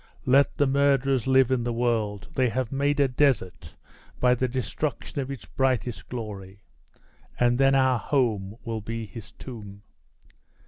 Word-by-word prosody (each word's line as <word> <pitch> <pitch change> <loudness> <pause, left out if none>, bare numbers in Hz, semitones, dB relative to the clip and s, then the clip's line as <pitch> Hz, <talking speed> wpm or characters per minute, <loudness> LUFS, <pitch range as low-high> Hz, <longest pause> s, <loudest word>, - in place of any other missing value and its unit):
Let 140 +2 +4
the 145 - +3
murderers 135 -2 +2
live 130 -1 +4
in 125 -2 +1
the 120 - -1
world 115 -4 -1
they 130 -2 +2
have 130 0 -2
made 140 +1 0
a 140 - +5
desert 120 - 0 0.4
by 125 0 +4
the 130 +1 0
destruction 130 +4 -3
of 135 - -5
its 135 -2 -7
brightest 125 -3 -1
glory, 100 -5 -7 0.8
and 120 0 +3
then 135 0 +5
our 130 -2 +3
home 110 -8 0
will 115 -2 -4
be 115 +1 -5
his 105 +1 -10
tomb!" 105 -5 -10
125 Hz, 150 wpm, -26 LUFS, 110-135 Hz, 0.8 s, a